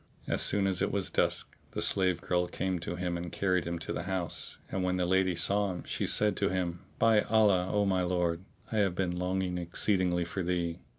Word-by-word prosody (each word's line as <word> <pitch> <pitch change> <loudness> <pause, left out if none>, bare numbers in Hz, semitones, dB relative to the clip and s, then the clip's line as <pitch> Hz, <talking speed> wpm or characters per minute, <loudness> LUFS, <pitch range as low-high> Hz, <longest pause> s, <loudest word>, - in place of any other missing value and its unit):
As - - +1
soon 100 -1 +2
as 95 -2 0
it - - +1
was 100 -1 -2
dusk, - - 0 0.2
the - - -3
slave 90 -2 +2
girl 90 0 0
came 95 0 -2
to 85 +1 -4
him 90 -1 -2
and 85 -1 -6
carried 90 -2 0
him 85 0 -2
to 80 - -5
the - - -3
house, 90 -4 -1
and 95 - -1
when 90 0 +1
the 90 - +1
lady 95 0 +2
saw 100 +4 +2
him 90 -1 -5
she - - -2
said 105 0 +2
to 100 - +1
him, 90 -2 -2 0.2
"By 110 -2 +4
Allah, 105 -5 +3
O 105 -1 +2
my 95 -2 +2
lord, 90 -1 0 0.3
I 110 - -1
have 100 -4 +2
been 90 -1 -1
longing 90 0 -1
exceedingly 90 0 0
for 95 +3 -4
thee." 85 -1 -1
90 Hz, 220 wpm, -30 LUFS, 90-95 Hz, 0.3 s, By